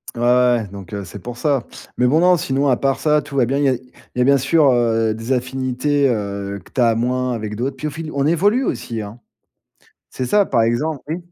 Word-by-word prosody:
Ouais, 120 - -5
ouais, 120 -2 +3
donc, 100 -1 -10
heu, 100 -1 -4
c'est 100 - -9
pour 120 +5 -8
ça. 140 -2 0 0.3
Mais 125 - +3
bon, 150 +6 +3
non, 180 +1 +5
sinon, 140 -3 0
à 130 -3 +3
part 135 +1 0
ça, 150 -1 +2
tout 140 - -10
va 130 -3 +3
bien. 135 +4 -1
Il - - +1
y - - +4
a - - +3
il - - -8 0.4
y 125 - 0
a - - +5
bien 140 +2 +4
sûr, 150 +4 +3
heu, 115 -2 +2
des 115 +3 -6
affinités, 130 +2 0
heu, 100 -3 -3
que - - -19
tu 130 - -1
as 115 -2 +4
moins 125 +2 0
avec 110 -2 -4
d'autres, 130 +5 -3
puis - - -6
au - - -4
fil 160 +1 -6
on 140 0 -1
évolue 200 - +2
aussi, 115 -2 -3
hein. 105 +3 -9 0.9
C'est 130 - -4
ça, 205 +10 +3
par 115 - +2
exem 120 +7 +1 0.2
mmh. 160 +3 -2
125 Hz, 250 wpm, -19 LUFS, 115-140 Hz, 0.9 s, non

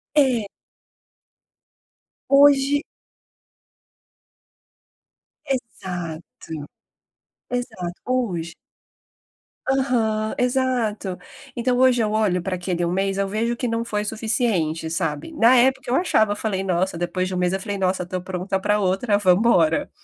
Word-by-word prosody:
É 255 -8 +3 1.8
Hoje 280 0 +5 2.6
Exato. 180 -10 -4 1.3
Exato. 220 -8 -3
Hoje 185 -11 -2 1.2
Aham, 230 -5 +1
exato, 245 -7 0 0.3
então 245 0 0
hoje 255 -1 +4
eu 215 - +1
olho 205 -5 +1
pra 185 +1 -2
aquele 175 -1 -2
1 170 - -1
mês, 195 +1 0
eu 200 0 0
vejo 220 +4 -1
que 250 - -2
não 230 0 -1
foi 210 -2 -2
suficiente, 210 -8 -1
sabe. 160 - -3
Na 250 -3 +5
época 265 +1 +2
eu - - +3
achava, 220 - +2
eu - - 0
falei: 195 -4 -2
"Nossa", 185 -1 0
depois 175 +2 -2
de 185 - -4
1 - - -2
mês, 180 0 +1
eu 190 - -1
falei: 200 +1 -4
"Nossa, 185 -1 0
tô 185 +1 -4
pronta 185 +1 -3
pra 210 +2 +2
outra, 200 +3 +1
vamos 185 -3 +4
embora". 170 -9 +3
210 Hz, 125 wpm, -22 LUFS, 180-245 Hz, 2.6 s, Hoje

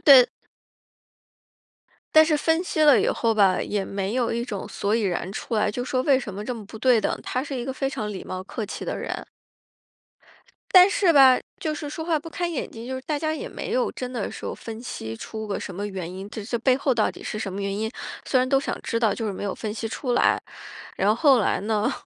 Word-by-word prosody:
对。 265 -4 +9 1.9
但 315 - +10
是 310 -1 +2
分 325 +3 +2
析 315 -3 0
了 290 -4 +7
以 - - +1
后 230 -1 +1
吧， 200 -3 +4
也 205 -1 -1
没 195 +1 -3
有 245 -2 +1
一 235 +1 -1
种 205 -6 -5
所 205 +2 -1
以 230 - +2
然 190 -2 -2
出 230 - -4
来， 210 0 +2
就 245 +3 -3
说 255 0 0
为 270 -2 +4
什 205 -6 -6
么 205 +2 -6
这 250 +2 -3
么 220 -3 -8
不 220 - -10
对 245 -1 +4
等， - - -1
他 255 - -2
是 280 -2 -5
一 240 - -3
个 265 - -3
非 270 +1 -1
常 210 -5 -4
礼 190 - -6
貌 185 0 -5
客 215 +2 -5
气 - - -6
的 - - -2
人。 - - -4 1.5
但 365 +1 +9
是 380 -4 +3
吧， 265 -3 +7 0.2
就 310 -1 -1
是 295 -1 -5
说 320 - -5
话 325 -2 +1
不 325 +2 -10
看 350 +1 -2
眼 315 - -3
睛， 230 +1 -9
就 260 - -4
是 260 - -4
大 295 +1 -2
家 310 +1 -1
也 - - -5
没 445 - -6
有 - - +1
真 250 -1 -5
的 235 -5 -3
说 - - -5
分 225 +1 -8
析 110 - -6
出 220 - -6
个 200 - -3
什 190 - -6
么 205 +2 -3
原 185 -4 -5
因， 190 +2 -7
这 215 - -6
这 235 +2 -2
背 255 +2 +3
后 270 -1 +1
到 220 -2 +2
底 - - -12
是 215 - -4
什 195 -3 -4
么 200 - -4
原 200 0 -2
因？ 220 +1 -2 0.3
虽 260 - +2
然 255 +1 +1
都 270 0 +4
想 275 - -3
知 230 - -1
道， 220 -4 +2
就 225 +1 -3
是 205 - -2
没 190 - -6
有 200 - -2
分 215 -1 -4
析 225 - -3
出 245 +2 -3
来。 - - +3 0.6
然 195 - +1
后 215 - +4
后 275 -3 +5
来 - - +1
呢， 215 +4 0
235 Hz, 270 characters per minute, -24 LUFS, 205-275 Hz, 1.9 s, 但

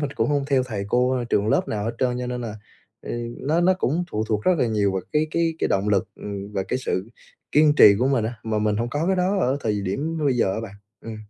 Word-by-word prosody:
mình 145 -2 -2
cũng - - 0
không 145 -1 +1
theo 135 -2 +2
thầy 105 -6 -4
cô, 125 +2 +1
trường 105 +1 +2
lớp - - +1
nào 105 -1 -2
hết 115 - -3
trơn, 125 -1 0
cho 125 - -3
nên 125 0 -4
là 110 -3 -5 0.8
nó 155 +5 0
nó 185 +2 +4
cũng 175 0 -1
phụ 110 +1 -1
thuộc 105 -1 0
rất 185 - +4 0.2
nhiều 100 -3 +1
vào 95 -1 -2
cái 155 +1 +2
cái 165 0 0
cái - - 0
động 100 +2 0
lực 100 -2 +1 0.5
và 95 - 0
cái 130 - 0
sự 95 -5 -3 0.4
kiên 150 0 +5
trì 100 - +8
của 125 +3 +2
mình, 130 -5 +1 0.2
mà 110 -1 -1
mình 105 0 +1
không 120 +2 -2
có 150 +5 -1
cái 190 - +2
đó 185 +2 +1
ở 130 +3 +1
thời 105 -4 -1
điểm 145 - -2
bây 130 -3 +2
giờ 95 -5 +2
á - - -3
bạn. 100 -3 -8 0.3
Ừm. 115 -1 -6
125 Hz, 255 wpm, -23 LUFS, 105-145 Hz, 0.8 s, trì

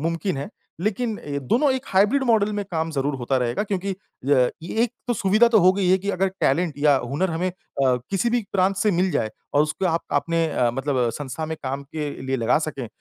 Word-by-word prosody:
मुमकिन 165 +2 -1
है। 140 - -4 0.3
लेकिन 215 +3 -1 0.3
दोनों 275 +3 +3
एक 260 - -2
हाइब्रिड 210 +9 +3
मॉडल 215 -3 +3
में 205 -1 -2
काम 160 -1 -1
ज़रूर 145 -1 -1
होता 130 +1 -1
रहेगा, 125 +7 0
क्योंकि 195 -2 -2
अ, - - -5 0.7
ये 175 - -6
एक 240 -1 0
तो 240 - +1
सुविधा 215 +4 +4
तो 225 -2 +5
हो 185 +1 +6
गई 190 -2 0
है 185 +1 +5
कि 200 +2 -2
अगर 195 0 +1
टैलेंट 160 +2 +1
या 145 -1 +4
हुनर 140 +9 -1
हमें 170 +3 -1
अ, - - -15 0.6
किसी 200 +5 +1
भी 240 0 +1
प्रांत 195 0 +2
से 210 +3 +2
मिल 185 0 +1
जाए 110 - -1 0.2
और 145 - +5
उसको 155 +5 -2
आप 165 -1 0
आपने 165 -1 +1
अ, 120 -4 +1
मतलब 135 -3 0
संस्था 145 +2 -4
में 160 - -4
काम 135 +1 -3
के 150 +1 -5
लिए 130 0 -1
लगा 115 +4 +2
सकें 145 -6 -4
170 Hz, 220 wpm, -23 LUFS, 145-200 Hz, 0.7 s, हो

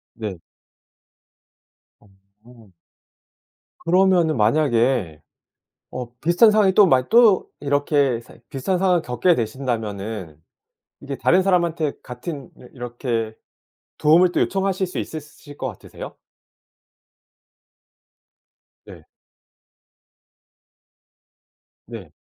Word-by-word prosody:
네. 105 -6 -6 1.6
어. 100 +2 -22 1.1
그러면은 175 -4 +2
만약에 115 - +1 0.7
어 125 -1 -6
비슷한 175 - +4
상황이 210 -3 +3
또 205 -1 +7
마 130 -4 +2
또 225 -5 +5
이렇게 145 -3 +1
상 - - -18
비슷한 175 +7 -2
상황을 180 -2 +2
겪게 125 +8 +1
되신다면은 110 - -4 0.6
이게 140 -1 -6
다른 185 - +3
사람한테 170 -5 0
같은 130 +3 -7
이러 125 - -14
이렇게 120 -3 -4 0.6
도움을 175 +4 +4
또 - - 0
요청하실 195 -1 0
수 - - -8
있으실 150 -2 -9
것 135 - -3
같으세요? 110 -7 -10 2.7
네. - - -13 2.8
네. - - -10
140 Hz, 190 characters per minute, -21 LUFS, 115-175 Hz, 2.8 s, 또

